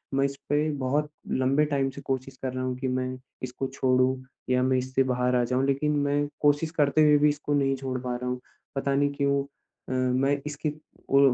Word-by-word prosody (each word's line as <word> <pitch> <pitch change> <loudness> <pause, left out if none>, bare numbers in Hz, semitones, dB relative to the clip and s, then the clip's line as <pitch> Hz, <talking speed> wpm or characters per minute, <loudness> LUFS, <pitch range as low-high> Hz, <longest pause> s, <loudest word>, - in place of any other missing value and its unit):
मैं 135 - +3
इसपे, 145 +2 -1
बहुत 145 +2 -1 0.2
लम्बे 135 +3 +2
टाइम 140 -2 0
से 140 - -9
कोशिश 130 0 -3
कर 130 -1 -2
रहा 130 0 -3
हूँ 130 0 -1
की, 130 0 -2
मैं 130 0 -2 0.3
इसको 130 +1 -3
छोड़ूँ 130 0 +2 0.3
या 125 0 +3
मैं 130 0 +3
इससे 130 +1 +1
बाहर 125 -1 +1
आ 120 - +3
जाऊँ, 130 +2 +1
लेकिन 140 +2 +1
मैं 145 +1 +1
कोशिश 145 +2 +3
करते 150 -1 +3
हुए 150 -1 +6
भी 150 +1 +4
इसको 145 0 -2
नहीं 135 -1 +2
छोड़ 130 -1 -3
पा 125 -1 -2
रहा 125 +1 -3
हूँ। 125 - -2 0.4
पता 140 0 0
नहीं 145 0 +3
क्यों 140 -1 +1 0.5
अ, - - -4
मैं 130 +2 +2
इसकी 150 +1 -2 0.4
ओ 135 - +5
135 Hz, 205 wpm, -27 LUFS, 130-145 Hz, 0.5 s, हुए